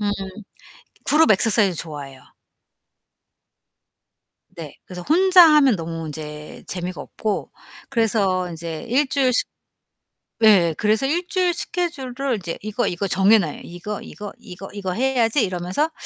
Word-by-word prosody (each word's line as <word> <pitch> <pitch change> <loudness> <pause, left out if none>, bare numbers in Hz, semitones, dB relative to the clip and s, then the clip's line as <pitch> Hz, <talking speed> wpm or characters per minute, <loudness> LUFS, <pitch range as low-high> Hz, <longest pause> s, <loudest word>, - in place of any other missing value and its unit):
음, 205 -1 0 1.0
그룹 305 -4 +5
액서사이즈 200 -4 +3
좋아해요. 145 -4 -6 2.3
네. 160 -4 -10
그래서 180 -1 -8
혼자 365 - +6
하면 275 -8 +5
너무 165 -1 -5
인제 150 0 -8
재미가 180 0 -5
없고 215 -2 -4 0.4
그래서 195 -5 +1
인제 165 -1 -6
1 265 +4 +2
주일씩 260 -3 +1 1.0
예예, 175 -7 +5
그래서 215 +4 +1
1 345 +5 -1
주일 365 -3 +1
스케줄을 275 -8 -3
이제 170 -3 -5
이거, 215 +3 -2
이거 195 +3 -2
정해 195 +4 +5
놔요. 160 -7 -3
'이거, 175 +4 -6
이거, 205 -1 -9
이거, 185 +2 -10
이거 195 -3 -4
해야지.' 245 +1 +1
이러면서 185 - -2
205 Hz, 275 characters per minute, -21 LUFS, 175-265 Hz, 2.3 s, 혼자